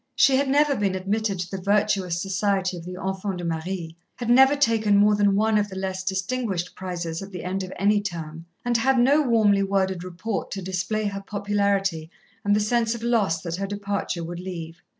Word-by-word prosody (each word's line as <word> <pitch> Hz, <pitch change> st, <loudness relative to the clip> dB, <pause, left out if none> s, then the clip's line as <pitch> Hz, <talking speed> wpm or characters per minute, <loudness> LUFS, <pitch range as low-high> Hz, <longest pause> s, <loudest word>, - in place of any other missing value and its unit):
She 270 Hz, -, +5 dB
had 275 Hz, 0 st, +1 dB
never 290 Hz, +1 st, +3 dB
been 200 Hz, -4 st, 0 dB
admitted 200 Hz, +1 st, -1 dB
to 180 Hz, -, -6 dB
the 195 Hz, -1 st, -4 dB
virtuous 200 Hz, -3 st, +1 dB
society 195 Hz, 0 st, 0 dB
of 170 Hz, -1 st, -8 dB
the 180 Hz, 0 st, -6 dB
enfants 190 Hz, 0 st, -3 dB
de 175 Hz, -, -6 dB
Marie, 165 Hz, 0 st, -4 dB, 0.2 s
had 240 Hz, -1 st, -2 dB
never 265 Hz, +3 st, +7 dB
taken 225 Hz, -6 st, +3 dB
more 210 Hz, +1 st, +5 dB
than 205 Hz, -1 st, +3 dB
one 215 Hz, +1 st, +3 dB
of 205 Hz, 0 st, -1 dB
the 190 Hz, -, -8 dB
less 190 Hz, 0 st, -3 dB
distinguished 190 Hz, -1 st, -2 dB
prizes 175 Hz, -3 st, -4 dB
at 195 Hz, -, -7 dB
the 180 Hz, -3 st, -6 dB
end 190 Hz, +2 st, -2 dB
of 185 Hz, -1 st, -6 dB
any 205 Hz, +1 st, +3 dB
term, 165 Hz, -4 st, -6 dB, 0.2 s
and 240 Hz, -1 st, +2 dB
had 265 Hz, +3 st, +2 dB
no 275 Hz, +5 st, +5 dB
warmly 220 Hz, -7 st, +3 dB
worded 190 Hz, -2 st, 0 dB
report 185 Hz, +4 st, -4 dB
to 195 Hz, -, -4 dB
display 190 Hz, +4 st, -2 dB
her 195 Hz, -1 st, -3 dB
popularity 200 Hz, -5 st, -1 dB, 0.3 s
and 205 Hz, -1 st, +3 dB
the -, -, +3 dB
sense 230 Hz, +2 st, +1 dB
of 230 Hz, -, -8 dB
loss 205 Hz, -9 st, +1 dB
that 170 Hz, -1 st, -3 dB
her 195 Hz, +1 st, -2 dB
departure 200 Hz, -3 st, -3 dB
would 170 Hz, +1 st, -6 dB
leave. 170 Hz, -2 st, -7 dB
195 Hz, 205 wpm, -24 LUFS, 180-215 Hz, 0.3 s, never